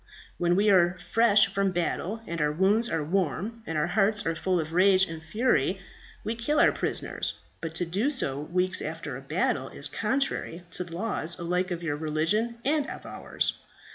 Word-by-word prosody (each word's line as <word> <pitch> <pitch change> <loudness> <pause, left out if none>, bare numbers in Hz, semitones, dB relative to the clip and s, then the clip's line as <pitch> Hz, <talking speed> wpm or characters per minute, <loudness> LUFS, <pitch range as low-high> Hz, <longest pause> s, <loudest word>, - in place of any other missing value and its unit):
When 175 0 +2
we 205 +2 +4
are 175 -1 +4
fresh 210 +3 +4
from 195 -1 0
battle, 185 +5 -2
and 170 -3 -4
our 150 0 +2
wounds 200 +8 +2
are 165 -2 -1
warm, 190 - -1
and 160 - -2
our 150 - +2
hearts 210 0 +2
are 165 - +1
full 180 +2 0
of 160 0 -4
rage 190 +1 +5
and 160 -1 -7
fury, 195 - +1 0.4
we 220 - -2
kill 240 +6 0
our - - +6
prisoners; - - -3 0.2
but 165 -1 -5
to 175 - -1
do 200 +11 0
so 140 - 0
weeks 180 +5 0
after - - -5
a - - -7
battle - - -1
is - - -3
contrary 265 -10 -2
to 180 - -2
the 170 -2 -9
laws 175 -4 -1
alike 180 +2 -1
of 175 -1 -4
your 145 -3 -1
religion 165 +10 0
and 295 +1 +1
of - - -8
ours. - - -2
180 Hz, 190 wpm, -27 LUFS, 165-215 Hz, 0.4 s, our